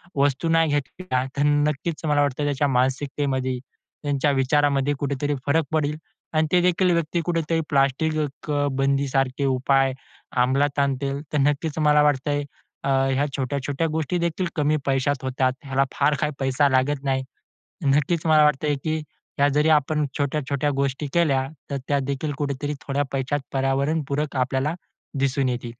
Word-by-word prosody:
वस्तू 140 +3 +1
नाही 165 -1 +3
घेतल्या, 145 -1 -2
तर 140 - +2
नक्कीच 150 +2 0
मला 145 -1 +3
वाटतंय, 145 +1 0
त्याच्या 145 0 +1
मानसिकतेमध्ये, 130 0 0 0.5
त्यांच्या 145 0 +1
विचारामध्ये 140 +1 +2
कुठेतरी 145 +1 -1
फरक 155 +2 +2
पडेल. 150 -1 0 0.4
आणि 155 0 +2
तेदेखील 180 +1 +3
व्यक्ती 170 0 0
कुठेतरी 165 -1 0
प्लास्टिक 140 +3 +2 0.6
बंदीसारखे 135 0 +1
उपाय 135 0 +2 0.4
अमलात 140 +3 +2
आणतील. 140 0 0
तर 150 - +2
नक्कीच, 145 +2 0
मला 150 -1 +5
वाटतंय, 145 0 +1 0.4
अ, 140 - -1
ह्या 135 +1 +2
छोट्या-छोट्या 140 +4 -1
गोष्टीदेखील 170 +3 -1
कमी 150 0 +2
पैशात 135 0 0
होतात. 130 0 +1
ह्याला 135 0 +1
फार 150 - +2
काही 150 - +1
पैसा 135 +2 +2
लागत 135 +2 +1
नाही. 135 -1 0 0.6
नक्कीच 150 +4 +2
मला 155 -1 +5
वाटतंय, 150 0 +2
की 155 0 0 0.4
ह्या 140 - +4
जरी 150 +3 +2
आपण 150 +2 -1
अ, - - +2
ह्या - - -1
छोट्या-छोट्या 145 0 0
गोष्टी 140 +2 -1
केल्या. 140 -6 +2 0.2
तर 140 - -1
त्यादेखील 140 +1 -1
कुठेतरी 145 0 -2
थोड्या 140 +1 +1
पैशात 135 +2 -1
पर्यावरणपूरक 140 +2 0
आपल्याला 130 +5 0 0.4
दिसून 135 -1 +1
येतील. 120 -1 -3
140 Hz, 140 wpm, -24 LUFS, 135-150 Hz, 0.6 s, मला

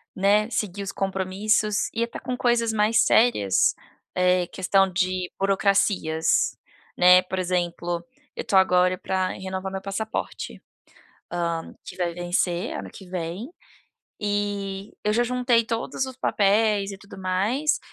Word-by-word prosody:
né, 205 +2 +3
seguir 200 -3 -2
os 195 - -4
compromissos 195 +2 0
e 230 - 0
até 235 - -5
com 255 -1 -4
coisas 240 -2 +2
mais 220 +1 +3
sérias, 160 - +3 0.4
eh, 180 0 +3
questão 195 +1 +2
de 185 0 -1
burocracias, 195 -4 +2 0.4
né. 180 +1 +7
Por 185 +1 -4
exemplo, 175 -1 -2 0.3
eu - - -4
tô - - -1
agora 180 -1 +4
para 185 0 -1
renovar 190 0 -5
meu 190 0 -4
passaporte, 205 +3 -4 0.7
hã, 170 -1 -2
que - - -9
vai 175 -2 -1
vencer 175 0 -1
ano - - -7
que 190 - -12
vem, 180 +5 -4 0.7
e 205 -1 -2
eu 210 - +2
já 240 +2 +3
juntei 245 -1 +2
todos 230 +4 -2
os 260 -1 -8
papéis 205 -2 +2
e 195 - -8
tudo 200 0 -13
mais, 200 +11 0
195 Hz, 135 wpm, -24 LUFS, 180-215 Hz, 0.7 s, né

